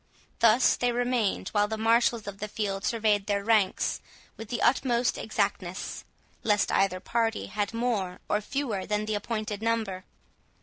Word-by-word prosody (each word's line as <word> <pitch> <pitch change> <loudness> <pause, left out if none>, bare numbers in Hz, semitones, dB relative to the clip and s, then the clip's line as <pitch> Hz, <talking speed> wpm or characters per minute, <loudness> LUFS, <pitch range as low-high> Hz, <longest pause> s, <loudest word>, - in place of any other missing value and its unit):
Thus 230 +2 +5
they 245 0 +1
remained 245 -3 0
while 205 -1 +2
the 220 +1 -3
marshals 230 0 +2
of 200 -1 -7
the 210 - -3
field 200 -2 -3
surveyed 215 -3 +1
their 200 -1 0
ranks 215 -3 +2 0.3
with 225 -1 -9
the 240 - -2
utmost 245 -2 +2
exactness, 200 -4 -3 0.4
lest 210 -2 +2
either 195 -2 +2
party 225 +3 -1
had 205 -1 -2
more 230 -6 -1
or 210 - +1
fewer 220 -5 -3
than 210 0 0
the 215 - -2
appointed 215 0 -3
number. 220 -5 -1
215 Hz, 150 wpm, -28 LUFS, 200-230 Hz, 0.4 s, Thus